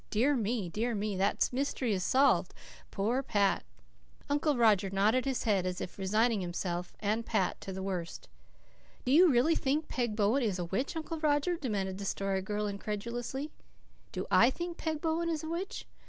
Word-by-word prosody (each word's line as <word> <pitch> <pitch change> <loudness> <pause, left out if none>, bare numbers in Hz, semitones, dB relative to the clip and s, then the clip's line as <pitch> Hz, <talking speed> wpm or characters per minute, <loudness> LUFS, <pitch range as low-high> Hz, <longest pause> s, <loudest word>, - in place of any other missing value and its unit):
"Dear 260 +7 +2
me! 225 -4 -1
Dear 225 +7 -2
me! 205 0 -2
That 195 +2 +2
mystery 255 -3 -1
is 185 -2 -1
solved. 275 +7 +3 0.3
Poor 225 +6 0
Pat!" 205 -6 +1 0.7
Uncle 290 -1 +2
Roger 210 -4 +4
nodded 210 +7 +2
his 265 -2 -1
head, 200 -4 +2
as 180 0 -3
if 180 - -7
resigning 215 +3 +2
himself 175 0 -3
and 215 +2 0
Pat 225 - -1
to 195 - -6
the 190 0 -5
worst. 180 -3 -4 0.8
"Do 255 - +1
you 345 +5 +7
really 260 +6 +4
think 300 +1 0
Peg 240 -4 -1
Bowen 220 +6 +2
is 210 -6 0
a 175 - -2
witch, 195 - -2
Uncle 320 0 -4
Roger?" 305 +3 +2
demanded 200 - -3
the 200 - -5
Story 195 0 -1
Girl 210 +2 -2
incredulously. 235 +7 -4 0.6
"Do - - -4
I 235 - +6
think 345 +4 -5
Peg 315 -2 -3
Bowen 335 +1 0
is 320 -1 -2
a 315 - -5
witch? 355 +4 -4
225 Hz, 180 wpm, -31 LUFS, 195-280 Hz, 0.8 s, you